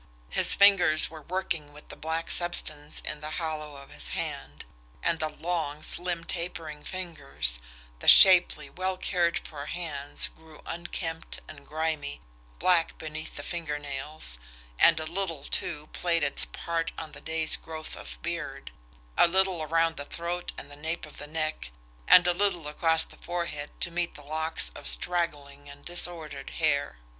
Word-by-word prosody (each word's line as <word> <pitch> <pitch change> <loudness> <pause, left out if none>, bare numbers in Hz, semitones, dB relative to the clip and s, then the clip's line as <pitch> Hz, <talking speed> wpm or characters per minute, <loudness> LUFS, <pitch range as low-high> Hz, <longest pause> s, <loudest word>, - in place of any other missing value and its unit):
His - - +6
fingers 185 -7 +6
were 160 -1 -9
working 165 -3 -3
with 150 - -15
the - - -8
black 160 +1 -2
substance 155 -4 +2
in 150 - -6
the 150 - -5
hollow 155 -3 -4
of 140 0 -13
his 70 -5 -1
hand 70 +4 -5 0.4
and 165 - +1
the 155 - -1
long, 155 -3 -3
slim, 175 -1 +1
tapering 165 -3 -5
fingers, 75 - -2 0.4
the - - -6
shapely, 180 -6 +8
well 185 +5 -3
cared 175 -2 +1
for 145 -2 -7
hands 145 -4 -1
grew 160 -1 -17
unkempt 165 -1 -5
and 145 -2 -12
grimy, 155 -2 -2 0.4
black 175 -3 +2
beneath 155 0 -7
the 145 - -6
finger 160 -2 -3
nails 145 - -1 0.4
and - - +6
a 155 - -4
little, 165 -3 -3
too, 150 +1 -2
played 170 -2 +1
its 140 - +5
part 165 -1 -3
on 155 -2 -6
the - - -12
day's 160 -1 0
growth 160 -1 -5
of 65 -2 -9
beard, - - -5 0.5
a - - +8
little 190 -1 +1
around 165 +1 +1
the 145 - -5
throat 175 +3 -4
and 145 - -8
at - - -9
the 145 - -16
nape 160 +1 -2
of 150 - -14
the 150 - -7
neck, 155 - -3 0.4
a - - +11
little 180 -2 +1
across 160 +2 +3
the - - -15
forehead 170 -4 -4
to 175 - +1
meet 175 0 -2
the 145 - -11
locks 155 - +2
of - - -7
straggling 145 - -1
and 140 0 -13
disordered 175 -3 0
hair. 145 - +1
160 Hz, 165 wpm, -28 LUFS, 145-170 Hz, 0.5 s, a